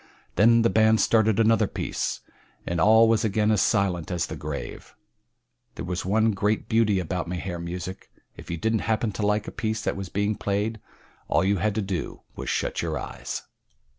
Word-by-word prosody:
Then 115 +4 +5
the 115 - +4
band 110 +2 +4
started 110 -1 +3
another 115 -1 +4
piece, - - -3 0.4
and 85 -1 -1
all 110 +4 +6
was 110 -1 +2
again 110 0 +2
as 105 - +3
silent 95 -6 +1
as 90 -2 -1
the - - -6
grave. 75 -1 -7 0.8
That - - -5
was 90 0 -3
one 110 +4 +2
great 105 +2 0
beauty 110 -3 +2
about 90 0 -3
Mahar 90 0 -4
music 90 +2 -6 0.3
if - - -12
you 85 - -2
didn't 110 +5 0
happen 110 0 +1
to 105 - -5
like 105 0 0
a - - -5
piece 110 0 -3
that - - -1
was 95 -2 -6
being 100 +2 0
played 105 +2 -2 0.5
all 85 +3 +2
you 100 +1 +2
had 105 +2 0
to 110 - 0
do 95 -3 -4
was - - -5
shut - - -1
your - - -2
eyes. - - -6
105 Hz, 190 wpm, -25 LUFS, 90-110 Hz, 0.8 s, all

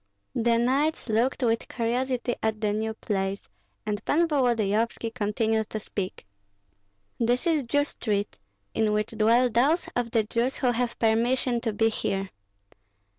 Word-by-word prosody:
The 235 0 +2
knights 270 +4 +1
looked 240 +5 +1
with 230 -1 +1
curiosity 245 +1 -1
at 220 -1 -1
the 210 -1 0
new 220 +1 -2
place, 195 -2 -3 0.4
and 210 0 -3
Pan 335 +3 +2
Volodyovski 230 -5 +1
continued 220 0 0
to 215 - -3
speak, 195 - -5 0.9
"This 245 +5 +1
is 325 -3 +3
Jew 285 +3 +1
street, 205 -7 -3 0.3
in 215 -1 +1
which 210 0 0
dwell 230 +3 +4
those 280 +10 +2
of 245 -1 0
the 225 -1 +2
Jews 235 +5 -1
who 250 -3 +1
have 240 0 -1
permission 235 +2 +1
to 230 - -1
be 225 +2 +2
here. 195 -3 -2
230 Hz, 145 wpm, -26 LUFS, 215-250 Hz, 0.9 s, dwell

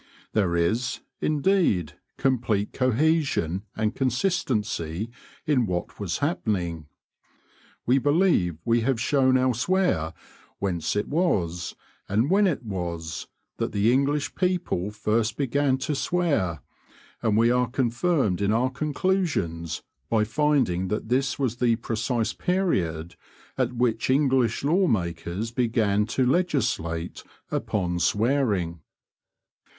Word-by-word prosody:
There 95 -5 +2
is, 115 +10 0 0.2
indeed, 150 - +2 0.2
complete 120 -6 0
cohesion 130 - +1
and 110 0 0
consistency 115 - -1 0.3
in 135 -7 +2
what 90 -1 -4
was 90 -4 -2
happening. 95 - -2 1.0
We 130 +3 +4
believe 145 - +2
we 115 0 +3
have 125 0 0
shown 130 0 +3
elsewhere 130 - +1 0.4
whence 90 -3 -1
it 105 - 0
was, 90 - 0 0.3
and 115 - +1
when 200 +1 +5
it 155 -8 -1
was, 85 -6 -4 0.3
that - - -2
the 105 +3 +3
English 140 +2 +1
people 180 - 0
first 110 +1 0
began 140 0 +1
to 140 +3 -2
swear, 140 - 0 0.6
and 110 -1 +2
we 115 +1 +4
are 125 -1 +2
confirmed 120 - +1
in 100 +1 +2
our 125 +4 +2
conclusions 140 - -1 0.3
by 110 -2 +3
finding 115 -7 +1
that 105 +2 -3
this 130 +1 +1
was 125 -4 -1
the 120 -2 +3
precise 115 0 -1
period 85 - -1 0.4
at - - 0
which 120 -2 0
English 130 -4 +2
law 175 +6 +3
makers 90 - -2
began 110 -4 +1
to 125 +3 +1
legislate 115 - 0 0.3
upon 90 -4 -1
swearing. 105 - +1
115 Hz, 115 wpm, -25 LUFS, 95-140 Hz, 1.0 s, when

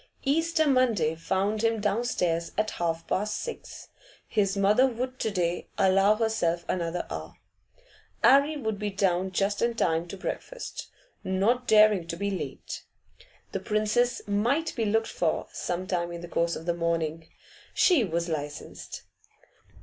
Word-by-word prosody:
Easter 315 +2 +2
Monday 235 - +3
found 195 +6 -1
him 225 -1 +2
down 210 +3 0
stairs 170 -8 -1
at 215 0 +1
half 165 -1 -1
past 210 +2 -1
six. 475 - -7 0.4
His 200 -2 +1
mother 210 +7 +4
would 255 +1 -4
to 220 - 0
day 175 -3 -1
allow 195 +2 +4
herself 215 -7 0
another 170 -1 -2
hour. - - -6 0.9
'Arry 280 +3 +5
would 220 -6 -3
be 210 -1 -1
down 190 -2 +1
just 200 +2 0
in 235 0 +1
time 165 -5 +1
to 195 - -7
breakfast, - - -6 0.4
not 220 +7 +1
daring 210 -5 +5
to 170 - -4
be 200 +2 -1
late. 190 - -5 0.7
The - - -2
Princess 215 +3 +1
might 240 +11 +1
be 230 - 0
looked 225 +2 +2
for 165 -2 -1
some 180 +1 -3
time 175 -2 -1
in 170 0 -6
the 175 - -7
course 170 0 0
of 160 - -7
the 170 - +1
morning; 165 -1 -1 0.5
she 345 -10 +5
was 170 -3 -1
licensed. 150 -3 -6
200 Hz, 150 wpm, -27 LUFS, 170-230 Hz, 0.9 s, Arry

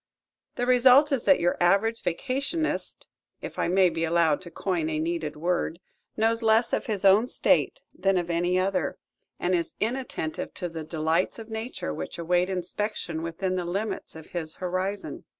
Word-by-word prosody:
The 245 - -1
result 255 +4 +6
is 270 -4 0
that 285 - +5
your 175 - +1
average 200 +6 +3
vacationist 275 - -2 0.3
if - - -7
I - - +1
may 185 +1 +4
be 165 0 -2
allowed 165 -2 +2
to 180 - -8
coin 170 -2 -2
a 155 - -1
needed 160 -1 -2
word 170 +1 -1 0.4
knows 225 +1 +2
less 225 +1 +3
of - - 0
his 205 -3 -1
own 200 +5 +6
State - - +1
than 195 -1 +1
of 175 -1 -1
any 175 +2 +1
other, 185 -4 0 0.4
and 180 - 0
is 170 -2 -1
inattentive 230 -9 -3
to 175 - -4
the 165 -1 -6
delights 160 +3 0
of 225 -1 -10
nature 220 +3 -4
which - - -6
await 175 +2 +1
inspection 180 -2 -3
within 185 +3 -2
the 180 - -1
limits 195 +3 -3
of 160 -1 -12
his 160 -3 -4
horizon. 185 +2 -3
185 Hz, 170 wpm, -26 LUFS, 170-220 Hz, 0.4 s, result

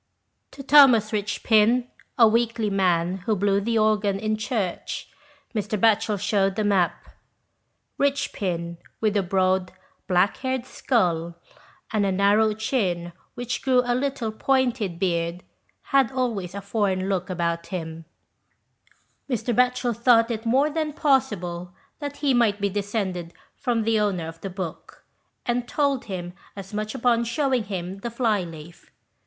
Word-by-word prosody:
To 275 - -10
Thomas 260 -7 +6
Richpin, 215 +3 +2 0.3
a 230 -3 +7
weakly 230 -1 +1
man 180 -2 +1
who 220 - +2
blew 200 0 +1
the 230 +2 0
organ 210 -2 +2
in 215 +1 0
church, 215 -4 -3 0.5
Mr. 215 -1 -2
Batchel 215 -1 +3
shewed 195 -1 +1
the 215 - 0
map. 195 -4 +1 0.9
Richpin, 180 -11 -1 0.2
with 215 -2 +1
a 200 - +3
broad, 185 0 +1 0.4
black 180 +2 +2
haired 260 -1 -2
skull 170 -11 0 0.6
and 215 -2 +2
a 195 - +1
narrow 205 +3 +3
chin 185 -7 -1 0.2
which 245 0 -3
grew 255 -2 +3
a 245 - +1
little 255 -3 -1
pointed 245 -6 0
beard, 170 -1 -1 0.5
had 270 -4 +4
always 225 -9 -2
a 200 - -4
foreign 195 -2 -1
look 190 -1 -1
about 170 -2 -2
him: 165 -3 -6 1.2
Mr. 240 -1 -1
Batchel 250 0 +2
thought 235 0 +4
it 225 0 -4
more 275 +6 +3
than 310 -1 -2
possible 185 - 0 0.2
that 285 -1 -5
he 275 - +4
might 225 -4 +2
be 200 0 0
descended 195 -4 -3 0.2
from 235 -2 -1
the 220 0 +2
owner 190 -6 -1
of 165 0 -10
the 195 - -4
book, 185 -3 -7 0.4
and 240 0 -1
told 280 -3 0
him 180 -3 -5 0.2
as 195 0 -9
much 215 +1 -3
upon 235 -1 +2
shewing 255 -1 0
him 190 -1 -5
the 235 - -4
fly 230 -4 +1
leaf. 165 -1 -11
210 Hz, 145 wpm, -24 LUFS, 185-240 Hz, 1.2 s, a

